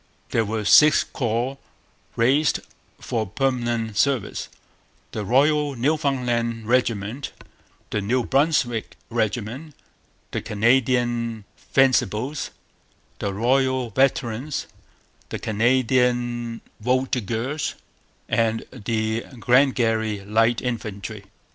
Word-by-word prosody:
There 115 - +2
were 110 0 -3
six 150 +7 +7
corps 125 +2 -2 0.6
raised 135 +6 +3 0.4
for 110 -3 -2
permanent 120 -2 -1
service: 135 -3 0 0.6
the 105 - -4
Royal 145 +5 +2
Newfoundland 125 -5 0
Regiment, 120 +1 0 0.6
the 105 - 0
New 120 +5 +1
Brunswick 135 -5 +1
Regiment, 120 +6 -2 0.6
the - - -2
Canadian 120 0 +1
Fencibles, 135 +1 +1 0.7
the 100 - -2
Royal 130 +3 +1
Veterans, 130 +2 0 0.6
the - - -3
Canadian 120 0 +1 0.2
Voltigeurs, 125 +3 -1 0.5
and 115 -1 +1
the 110 -1 -1 0.2
Glengarry 115 -5 +2
Light 115 +3 +2
Infantry. 110 -4 -5
120 Hz, 85 wpm, -23 LUFS, 110-130 Hz, 0.7 s, six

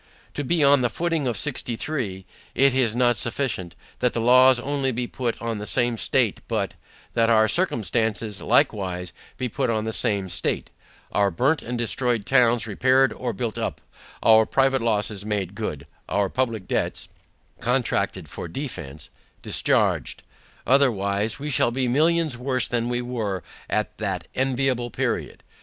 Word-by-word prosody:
To 145 - -3
be 160 +3 +1
on 140 -1 +5
the 120 - +1
footing 165 +2 -1
of 120 -4 -1
sixty 125 -2 -3
three, 110 -9 -4 0.3
it 135 -1 +4
is 120 -4 +1
not 120 -2 +3
sufficient, 100 -6 -2 0.2
that 125 -1 +1
the - - -1
laws 130 +2 +6
only 140 0 -1
be 125 +1 -2
put 120 -1 -3
on 115 -2 -3
the 105 - -6
same 120 -1 +2
state, - - +1
but, - - -1 0.4
that 115 0 +2
our 110 -1 +5
circumstances, 110 - 0
likewise, 90 -4 +1 0.2
be 130 - -2
put 115 - -2
on 110 -2 0
the 110 - -2
same 100 -3 +2
state; - - -2 0.4
Our 100 -1 +2
burnt 130 - +1
and 120 +1 -4
destroyed 120 -1 0
towns 120 -3 +3
repaired 130 +3 +3
or 125 +2 -3
built 115 +1 -4
up, - - -3 0.4
our 110 -1 +6
private 135 -1 +2
losses 105 -3 0
made 100 -3 -2
good, 100 -10 -5 0.2
our 100 -1 +1
public 115 -5 -2
debts - - -2 0.5
(contracted 125 0 0
for - - -7
defence) 80 - -7 0.3
discharged; - - +1 0.4
otherwise, 110 -6 +2
we 150 +2 -4
shall 125 - +3
be 130 +1 -1
millions 155 0 +2
worse 130 -1 +1
than 120 0 -1
we 120 0 -1
were 110 -7 -3 0.3
at - - -2
that - - -3
enviable 130 -2 0
period. - - -3
120 Hz, 155 wpm, -24 LUFS, 105-130 Hz, 0.5 s, laws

